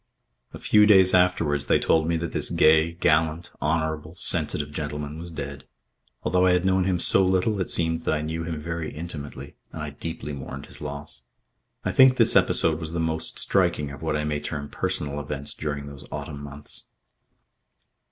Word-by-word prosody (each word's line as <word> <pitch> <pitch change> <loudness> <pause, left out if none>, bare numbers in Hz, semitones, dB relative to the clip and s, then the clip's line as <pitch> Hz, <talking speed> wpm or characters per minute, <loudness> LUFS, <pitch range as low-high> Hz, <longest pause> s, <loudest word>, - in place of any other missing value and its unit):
A - - -9
few 105 -1 +4
days 95 -3 +6
afterwards 85 -6 +2
they - - +4
told 80 -1 +1
me 85 0 +1
that 85 0 -4
this - - -1
gay, 80 +1 +4
gallant, 80 0 0
honourable, 80 +1 -2
sensitive 75 -3 +2
gentleman 75 0 -5
was 85 +1 -7
dead. 70 -4 -7 0.6
Although 90 0 +2
I 90 - +4
had 90 0 +1
known 95 -1 +2
him 95 -2 +1
so 95 +2 +6
little, 95 +2 +1
it - - -3
seemed 80 -1 0
that - - -1
I 75 - -3
knew 80 +1 -4
him 80 -2 -4
very 85 +1 -5
intimately, 75 -3 -8
and 80 - -6
I 75 - -5
deeply 75 0 -6
mourned 70 0 -8
his - - -10
loss. 70 -3 -8 0.6
I - - 0
think 130 -1 +6
this - - +5
episode 80 -1 +3
was 80 -1 -5
the 85 - -2
most 80 0 -1
striking 75 -1 0
of 70 - -10
what 80 -1 -1
I 75 - -2
may 75 -1 -2
term 75 -1 -6
personal 75 0 -2
events 70 -1 -4
during 70 -2 -4
those 70 -1 -11
autumn 70 0 -6
months. 70 0 -10
80 Hz, 185 wpm, -24 LUFS, 75-85 Hz, 0.6 s, days